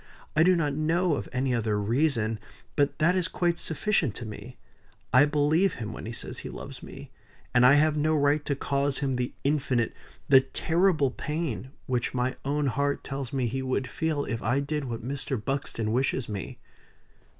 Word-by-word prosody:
"I 155 - +4
do 180 +2 +6
not 150 -4 0
know 165 +3 +1
of - - -3
any 130 0 0
other 110 -3 0
reason; 115 -1 +1 0.4
but 145 -1 +1
that 170 +3 +3
is 185 -2 +2
quite 175 -2 0
sufficient 160 - 0
to 120 - -6
me. 105 -1 -9 0.6
I 130 +3 +7
believe 150 +6 +2
him 110 -2 -5
when - - -7
he - - -4
says 120 - -5
he - - -7
loves - - -8
me; - - -10 0.4
and 125 0 +5
I 130 +3 +8
have 155 +1 +4
no 155 +1 +2
right 145 0 +2
to 140 - 0
cause 140 0 0
him 135 -2 -1
the 125 0 -1
infinite 135 -5 +1 0.3
the 135 -1 +8
terrible 160 0 +1
pain, 150 -4 -3 0.2
which 125 0 -1
my 125 +1 0
own 145 +2 0
heart 140 +2 0
tells 135 -2 -5
me 130 -3 0
he 130 +3 -2
would 130 0 -1
feel, 155 -3 -1
if 115 - -3
I 125 +6 +1
did 145 0 -2
what 120 -1 -5
Mr. 140 0 -2
Buxton 115 -2 -2
wishes 130 0 0
me." 100 -3 -5
140 Hz, 185 wpm, -27 LUFS, 125-155 Hz, 0.6 s, I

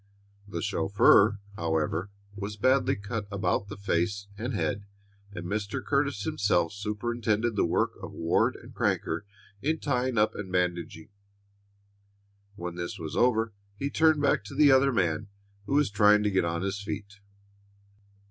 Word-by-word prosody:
The 85 -5 -4
chauffeur, 105 - +4 0.2
however, 80 +3 -1 0.3
was 105 +1 -5
badly 130 +3 +3
cut 105 +1 -5
about 100 0 0
the 100 - -8
face 100 +1 -1
and 115 +5 -4
head, 100 0 -1 0.5
and 90 -3 -7
Mr. 100 +2 -3
Curtis 140 -6 0
himself 90 -5 +1
superintended 110 +2 -1
the 100 - +2
work - - +1
of - - -7
Ward 85 0 +1
and - - -13
Crancher 80 +5 -1 0.4
in 155 +3 0
tying 130 -4 -1
up 105 +1 +3
and 95 -3 -7
bandaging. 90 -1 -2 1.5
When 90 -3 -5
this 85 +4 -4
was 80 -3 -6
over 115 -3 +2 0.2
he 140 +5 -3
turned 160 -2 +3
back 140 - +2
to 100 - -9
the 145 -2 +6
other 135 +1 +5
man, 85 -9 0 0.4
who 140 - 0
was 145 -7 +3
trying 105 0 +5
to 105 - +1
get 95 -3 +2
on 85 +1 -2
his 100 +1 -2
feet. 100 +1 -6
100 Hz, 150 wpm, -28 LUFS, 90-120 Hz, 1.5 s, the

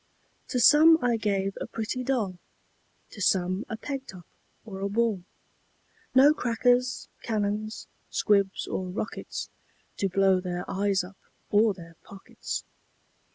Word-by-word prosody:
To 250 - -1
some 310 +6 +7
I 240 -1 +3
gave 195 -3 -1
a - - -3
pretty 230 +3 -3
doll, 225 -9 -1 0.7
To 205 - -10
some 185 +2 +1
a 220 - -4
peg 270 +2 -5
top, 180 -2 -11 0.4
or 195 -4 -8
a 200 - -1
ball; 220 -2 +1 0.9
No 280 +3 +7
crackers, 245 -1 +1
cannons, 215 0 -2 0.2
squibs, 200 -2 +1
or 185 - -3
rockets, 210 +4 -5 0.5
To 195 - 0
blow 190 0 +3
their 180 -1 -4
eyes 195 -1 0
up, 190 +2 -12 0.3
or 210 0 +4
their 165 -2 -13
pockets. 195 -1 -7
205 Hz, 130 wpm, -27 LUFS, 190-235 Hz, 0.9 s, some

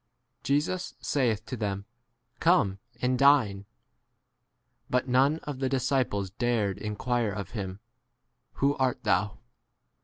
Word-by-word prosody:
Jesus 150 +7 -1
saith 115 -6 0
to 130 - -5
them, 100 -3 -3 0.5
Come 130 - +3 0.2
and 125 0 +2
dine. 125 -9 +4 1.2
But 125 +1 +1
none 135 +5 +3
of 145 -3 -5
the 135 -1 0
disciples 130 -7 0
dared 110 -3 0
in 105 -1 -4
quire 120 -1 0
of 100 -3 -5
him, 95 -3 -5 0.7
Who 140 +1 +1
art 130 -2 0
thou 100 0 +1
120 Hz, 120 wpm, -28 LUFS, 100-135 Hz, 1.2 s, dine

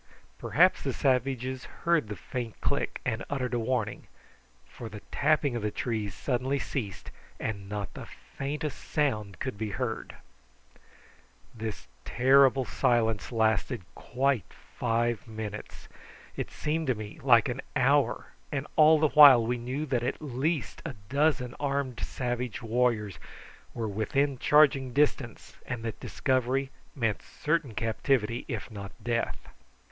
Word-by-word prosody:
Perhaps - - +4
the - - -2
savages 130 0 0 0.2
heard 170 -8 +3
the 105 - -5
faint 115 +4 -6
click, - - -1
and - - -1
uttered 130 -3 -2
a 120 - +1
warning, 115 -3 -2 0.6
for 115 - -9
the 105 -1 -9
tapping 145 -3 +2
of 120 - -2
the 105 - 0
trees 105 -3 -3
suddenly 130 +1 -1
ceased, 115 -8 -5 0.3
and 100 -3 -4
not 105 -2 -4
the - - -8
faintest 150 +1 -5
sound 110 - -1
could 115 0 -4
be 110 -1 -2
heard. 115 +1 -4 1.4
This 110 -2 -6 0.2
terrible 135 +1 +4
silence 115 -3 +1
lasted 110 0 +1
quite 130 - -1 0.2
five 120 -2 0
minutes. 110 -1 -7 0.5
It - - -3
seemed 155 +1 -2
to 130 - +2
me 105 -1 -8
like 120 -4 +5
an 125 +2 -3
hour, 140 +2 +2 0.2
and 140 -1 -2
all 155 0 +7
the 155 0 +3
while 140 -6 +9
we 120 +2 0
knew 130 +6 -3
that 130 -5 0
at 125 +3 -2
least 150 +2 -2
a - - -5
dozen 140 -3 +1
armed 140 -4 -1
savage 120 -2 -3
warriors 115 -3 0 0.6
were 115 -2 -2
within 135 +6 0
charging 140 -4 +4
distance, 140 -4 0
and 120 -2 -4
that 110 - -4
discovery 130 +1 0 0.2
meant 115 -6 0
certain 150 -7 -2
captivity, 115 +1 0
if 115 +1 -5
not 100 -3 -7
death. 115 -1 -2
125 Hz, 135 wpm, -29 LUFS, 110-140 Hz, 1.4 s, while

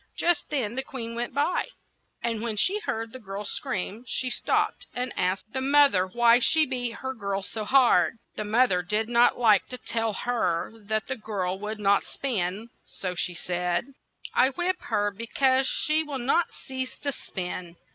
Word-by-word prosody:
Just 345 -1 +2
then 250 -8 -1
the 260 - -1
queen 235 -4 -6
went 240 +1 -3
by, 290 +7 0 0.6
and 230 -2 -1
when 225 -2 -2
she 390 - +2
heard 225 - -3
the 260 - -9
girl's 200 -2 -5
screams 210 +5 -4
she 255 -1 -1
stopped - - 0
and 250 0 -2
asked 185 +4 -1
the 260 - -1
moth 285 0 +5
er 185 0 +2
why 235 +4 +5
she 310 +5 +4
beat 245 -3 -2
her 265 +2 -5
girl 200 -3 -3
so 215 +1 -5
hard. 250 -1 +4 0.2
The - - -3
moth 230 +4 +3
er 180 -1 +2
did 210 +5 0
not 240 0 +4
like 220 -5 +4
to 250 - -5
tell 225 -3 -2
her 200 -6 -1
that 215 0 -3
the 265 - -3
girl 190 -4 -3
would 210 +1 -4
not 200 -1 +3
spin, 215 -4 -3 0.2
so 185 -2 -4
she 175 0 -1
said: 180 +8 -2 0.4
"I 260 - +5
whip 355 +7 -1
her 205 0 0
be 225 +4 -7
cause 265 +1 +3
she 305 +3 +2
will 295 -3 -4
not 270 +7 +1
cease 260 -1 -5
to 285 - -2
spin. 180 -7 -6
230 Hz, 185 wpm, -26 LUFS, 200-260 Hz, 0.6 s, moth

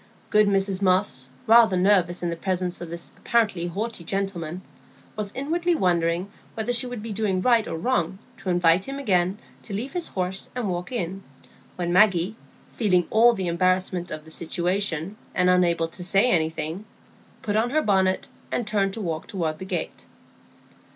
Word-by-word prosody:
Good 210 0 +5
Mrs 195 -1 +1
Moss, 185 -9 +1 0.2
rather 225 -4 +6
nervous 180 -2 +3
in 170 - 0
the - - -2
presence 180 0 -2
of 175 - -6
this 170 +1 -7
apparently 210 -7 +1
haughty 205 +2 -4
gentleman, 185 -2 -3 0.5
was 210 -2 -4
inwardly 340 +6 0
wondering 175 - +1 0.2
whether 225 +2 -1
she 240 +1 +3
would 245 -4 -6
be 225 - -5
doing 200 -3 0
right 230 +2 +3
or 165 - -4
wrong 185 -2 0 0.2
to 190 - -5
invite 175 +1 +3
him 275 0 -5
again 190 -7 +1 0.2
to 205 - -6
leave 245 +9 -4
his 350 -2 -1
horse 185 0 -3
and 245 -4 -2
walk 175 +1 -3
in, 195 -5 -3 0.5
when 175 -1 -2
Maggie, 190 0 +4 0.4
feeling 185 -6 +2
all 235 +2 +6
the 190 -4 -3
embarrassment 185 +1 +1
of 155 0 -7
the 160 - -7
situation, 175 +2 -2 0.2
and 180 0 +4
unable 170 -2 +2
to 180 - -5
say 195 +7 +3
anything, 160 +3 -1 0.6
put 205 -1 -1
on 225 +3 +2
her 310 +4 +1
bonnet, 190 -2 +2 0.2
and 240 - -1
turned 200 -2 0
to 225 - -5
walk 165 -4 -3
toward 165 -7 -2
the 190 - -6
gate. - - -4
190 Hz, 170 wpm, -24 LUFS, 175-215 Hz, 0.6 s, rather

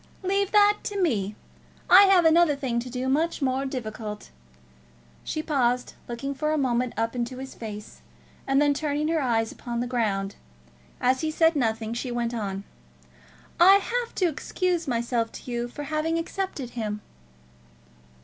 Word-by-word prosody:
"Leave 395 +1 +1
that 415 0 +5
to 405 -1 -4
me. 215 - 0 0.5
I 385 +3 +9
have 380 -3 +5
another 320 -2 +5
thing 260 -4 -1
to 250 +2 -5
do 250 +1 -3
much 310 +5 +1
more 270 -1 0
difficult." 215 -5 -6 0.9
She 310 - -3
paused, 250 -5 0
looking 260 +4 -4
for 305 +3 -1
a 310 - +1
moment 250 -3 0
up 225 +2 -1
into 245 +1 -3
his 265 +1 -7
face, 210 -2 -8 0.5
and 270 0 +3
then 290 0 +4
turning 300 +1 -1
her 325 -1 +1
eyes 225 -4 +1
upon 235 -1 -5
the 245 - -1
ground. 205 -5 -1 0.6
As 255 +1 +2
he 315 - 0
said 325 +1 +3
nothing, 225 -4 -1
she 245 +2 -3
went 240 0 -2
on. 200 -4 -3 1.0
"I 375 +3 +9
have 470 +4 -1
to 370 - +2
excuse 345 +2 -1
myself 235 -2 -1
to 250 - -8
you 240 0 -2
for 290 +4 -7
having 310 +2 -1
accepted 330 -7 -4
him." 210 -3 -4
260 Hz, 160 wpm, -26 LUFS, 235-320 Hz, 1.0 s, I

